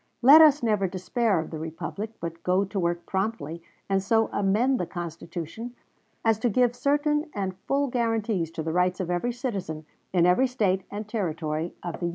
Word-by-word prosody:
"Let 290 +6 +10
us 300 -3 +6
never 210 -4 +2
despair 195 +4 0
of 160 - -5
the 160 - -5
republic, 165 +7 -5
but 165 0 -6
go 185 +2 +2
to 195 +1 -4
work 175 -1 -1
promptly 190 -4 -3 0.3
and 195 -1 +1
so 225 +3 +2
amend 220 +7 +2
the 180 - -2
Constitution 170 +6 -6 0.5
as 225 -1 +3
to 240 - +1
give 245 +2 +2
certain 295 +4 +1
and 190 -2 -2
full 280 +1 +2
guarantees 225 - 0
to 165 -2 -4
the 160 - -2
rights 180 +1 +1
of 180 -2 -2
every 175 +8 0
citizen, 195 - -4 0.3
in 175 -2 +3
every 180 +9 +4
State 205 -7 +1
and 205 +1 -6
Territory 165 -6 -3
of 175 -2 -5
the 175 - -2
Union." - - 0
195 Hz, 190 wpm, -26 LUFS, 175-235 Hz, 0.5 s, Let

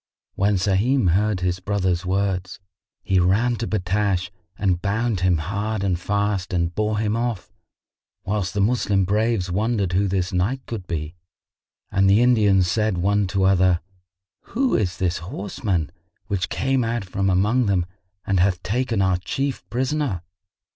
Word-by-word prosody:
When 100 +2 +1
Sahim 100 +4 +2
heard 100 +1 +1
his 90 0 0
brother's 95 -2 -1
words, 95 -1 -1 0.4
he 95 -1 +2
ran 105 +7 +2
to 115 - -3
Battash 100 -1 0 0.3
and 95 -3 0
bound 110 +1 0
him 90 -1 +2
hard 100 +6 -2
and 90 -3 0
fast 100 -1 -1
and 85 -1 0
bore 105 +2 0
him 105 0 0
off, 115 -4 -3 0.7
whilst 100 -1 -2
the 100 - +1
Moslem 100 -3 +2
braves 105 -2 0
wondered 100 -1 0
who 100 +2 +2
this 95 -1 -1
knight 115 +9 -1
could 105 -6 -6
be 80 -1 -4 0.8
and 95 0 +3
the 105 +5 +5
Indians 105 -6 +4
said 105 0 0
one 100 +2 +1
to 95 +1 0
other, 95 -2 +4 0.8
"Who 265 +1 +2
is 95 -5 0
this 90 -2 0
horseman 95 -1 -3 0.3
which 95 -2 -2
came 135 -1 0
out 115 -2 -2
from 95 +1 -1
among 105 +6 +2
them 95 -3 +1 0.4
and 95 -2 +1
hath 90 0 +1
taken 115 +1 0
our 95 -1 +2
Chief 135 +9 -3
prisoner?" 130 - -1
100 Hz, 155 wpm, -23 LUFS, 90-110 Hz, 0.8 s, the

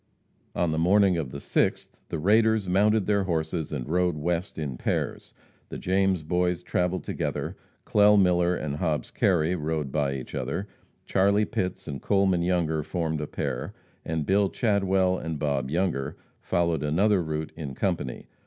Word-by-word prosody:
On 85 -2 +1
the 80 - 0
morning 95 +2 +4
of 75 -6 -2
the 70 - -7
6th, - - 0 0.2
the - - -2
raiders 110 +4 +3
mounted 105 +3 +3
their 100 -2 +1
horses 80 -2 -2
and 70 -5 -4
rode 90 0 +1
west 85 +4 -2
in 75 -5 -3
pairs. - - -2 0.4
The - - -6
James 95 -2 +1
Boys 90 +2 0
travelled 90 +1 -1
together, - - -3 0.3
Clell 105 0 +5
Miller 90 -1 +3
and 75 -3 -3
Hobbs 80 -3 -1
Kerry 90 -2 +2
rode 75 -4 -2
by 70 -2 0
each 65 - -7
other, 100 - -3 0.4
Charlie 100 +2 +3
Pitts 90 -4 -3
and 70 -4 -5
Coleman 95 -3 +2
Younger 85 -3 +1
formed 80 -1 -2
a 75 - -3
pair, 65 -2 -4 0.3
and 80 -2 -2
Bill 100 +2 +3
Chadwell 95 -4 +1
and 80 -1 -4
Bob 70 -3 -1
Younger 80 -4 -1 0.2
followed 85 -3 0
another 95 +7 +2
route 80 -1 -3
in 70 -5 -6
company. - - -2
85 Hz, 160 wpm, -26 LUFS, 75-95 Hz, 0.4 s, Clell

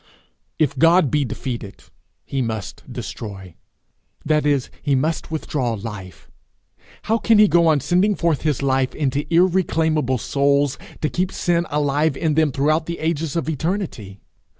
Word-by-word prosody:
If 140 -4 0
God 165 -2 +5
be 150 -2 +1
defeated, 115 -4 -6 0.4
he 135 - -2
must 110 - -5
destroy 95 -5 -7 0.7
that 150 -1 +2
is, 140 -3 0
he 145 -2 +1
must 155 +5 -1
withdraw 145 -6 -2
life. 100 -4 -8 0.8
How 225 +1 +1
can 225 0 +4
he 210 0 +7
go 170 -3 +4
on 155 -3 +3
sending 190 +8 +2
forth 165 -6 0
his 150 -3 -1
life 130 -1 +1
into 145 0 -2
irreclaimable 165 -6 +2
souls, 140 +2 +1 0.2
to 155 - +1
keep 185 +1 -1
sin 170 -1 0
alive 145 0 +1
in 160 -2 0
them 155 -1 +2
throughout 155 +4 +1
the 170 0 -4
ages 160 -1 -2
of 165 -4 -1
eternity? 160 - -3
150 Hz, 150 wpm, -21 LUFS, 130-165 Hz, 0.8 s, he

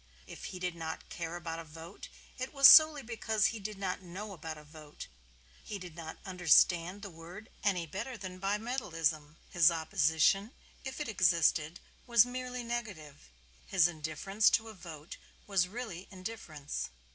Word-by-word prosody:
If - - -10
he 185 - -6
did 180 -1 -3
not 160 -1 -6
care 170 -1 -5
about 165 -1 -5
a - - -6
vote 165 +4 -11 0.3
it 255 +3 -5
was 275 0 +9
solely 310 -1 +8
because 225 -2 -1
he 225 - -6
did 210 0 -6
not 185 -2 -3
know 190 +4 -8
about 160 -3 -7
a 150 - -12
vote; 150 0 -11 0.6
he 205 - -6
did 180 -4 -10
not 160 -1 -8
understand 180 +1 +3
the 200 - -7
word 170 +6 -12
any 185 -5 +1
better 225 - -6
than 185 -2 -8
Bimetallism. 175 - -2
His 175 -2 +6
opposition, 165 - +1 0.3
if 265 +2 -6
it 295 - -3
existed, 170 -5 +2 0.3
was 235 -2 +6
merely 250 0 -5
negative. 205 - -6 0.4
His 180 -4 +4
indifference 175 +6 +1
to 225 0 +1
a - - -9
vote 160 -4 -10 0.3
was 195 -3 +2
really 195 -4 -7
indifference. 185 -7 -6
185 Hz, 155 wpm, -32 LUFS, 165-215 Hz, 0.6 s, was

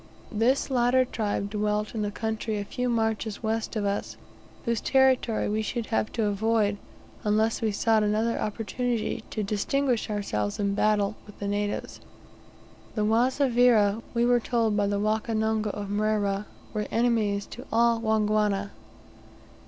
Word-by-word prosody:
This 245 +5 +1
latter 255 +1 +3
tribe 205 -4 -2
dwelt 210 0 -1
in 220 -2 -2
a - - -1
country 220 +1 -3
a 205 - -3
few 250 +4 -2
marches 220 -1 -1
west 225 +1 -2
of 210 -2 -1
us; 200 0 -2 0.5
whose 235 -3 0
territory 260 -4 +3
we 215 +1 0
should 230 +2 -3
have 215 - +1
to 230 - 0
avoid, 205 0 +1 0.5
unless 215 +2 +1
we 220 -2 +1
sought 220 +2 +2
another 215 +2 +1
opportunity 225 +1 -2
to 215 - -3
distinguish 235 +5 0
ourselves 105 - -2
in 200 -1 +1
battle 210 0 +1
with 205 - -13
the 200 - -4
natives. 205 0 -2 1.0
The 210 -2 +1
Wazavira, 235 -2 +3
we 235 0 +3
were 245 0 +4
told 230 -2 0
by 205 -1 +2
the 200 0 0
Wakonongo 220 0 0
of 205 0 -5
Mrera, 205 -1 0 0.3
were 210 -1 -2
enemies 225 -4 +1
to 250 - -9
all 235 0 +3
Wangwana. 210 -2 +1
215 Hz, 145 wpm, -27 LUFS, 205-230 Hz, 1.0 s, were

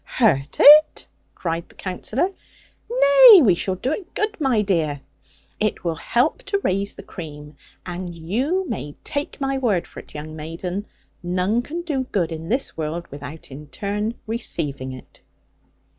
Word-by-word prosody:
'Hurt 145 - +1
it!' 305 +1 +8 0.3
cried 165 -1 -3
the - - -19
Counsellor: 220 - -2 0.6
'nay, - - +8
we 200 -7 +5
shall 185 +2 -2
do 250 +9 -2
it 355 +3 -5
good, 425 +1 -1
my 250 -7 +2
dear. 160 -7 0 0.6
It 215 -1 -1
will 170 -2 0
help 240 - 0
to 405 0 0
raise 195 +2 0
the 195 - -10
cream: 150 -6 -9 0.3
and 175 -1 -6
you 260 - -1
may 145 - -5
take 290 -1 -4
my 270 -1 -1
word 210 -9 +1
for - - -11
it, - - -15
young 155 +1 -7
maiden, 175 +6 -5 0.3
none 185 +6 0
can 330 +7 -6
do 280 -6 -2
good 180 -9 -1
in 160 +1 -6
this 260 +5 -1
world, 160 +2 -4
without 145 +2 -9
in 145 +3 -10
turn 205 - -3
receiving 150 - -2
it.' 130 -1 -13
195 Hz, 160 wpm, -22 LUFS, 160-270 Hz, 0.6 s, it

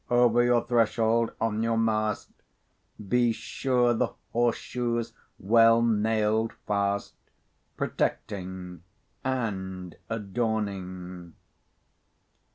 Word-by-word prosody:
Over 120 -1 +4
your 120 -1 +3
threshold, 115 -1 +2
on 110 -1 0
your 115 0 +1
mast, 110 -2 0 0.8
Be 120 +2 +3
sure 125 +1 +1
the 120 0 +1 0.2
horse 120 0 +2
shoe's 120 -2 -2 0.2
well 115 +2 +5
nailed 110 0 +1
fast, 100 0 0 0.6
Protecting 90 -3 -3 0.4
and 95 -8 -3
adorning. 95 -5 -3
110 Hz, 80 wpm, -27 LUFS, 100-120 Hz, 0.8 s, well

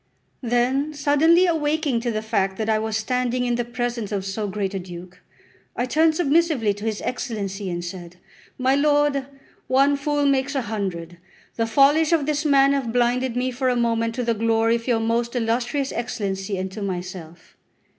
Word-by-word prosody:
Then 260 +5 0
suddenly 305 +5 +4
awaking 310 -5 0
to 240 +1 -2
the 215 -1 -2
fact 195 -3 -1
that 220 0 -2
I 215 -1 +2
was 220 0 -1
standing 250 +2 -1
in 245 - 0
the 240 0 0
presence 240 -2 -3
of 195 -2 -2
so 205 +2 -3
great 200 0 -3
a 195 - -2
duke, 180 0 -10 0.5
I 245 - 0
turned 315 +4 +3
submissively 310 -8 +2
to 205 +2 -8
his 220 -2 -2
Excellency 200 -5 -4
and 175 0 -4
said: 175 -1 -8 0.4
"My 260 +1 +2
lord, 290 -1 +2 0.4
one 275 +2 +3
fool 290 +1 0
makes 275 0 +1
a 270 - 0
hundred; 185 -6 -4 0.4
the 230 -1 0
follies 290 +7 +4
of 320 -4 +2
this 300 +1 -1
man 275 -1 +5
have 265 -5 -1
blinded 245 +1 +1
me 255 +1 0
for 255 +1 0
a 250 - +1
moment 230 -1 0
to 250 - -2
the 235 -1 +1
glory 225 +1 +2
of 230 +1 -5
your 235 -3 +2
most 230 +2 -1
illustrious 245 +4 -1
Excellency 200 -5 -3
and 185 0 -4
to 210 - -7
myself. 180 -3 -6
240 Hz, 185 wpm, -23 LUFS, 210-275 Hz, 0.5 s, man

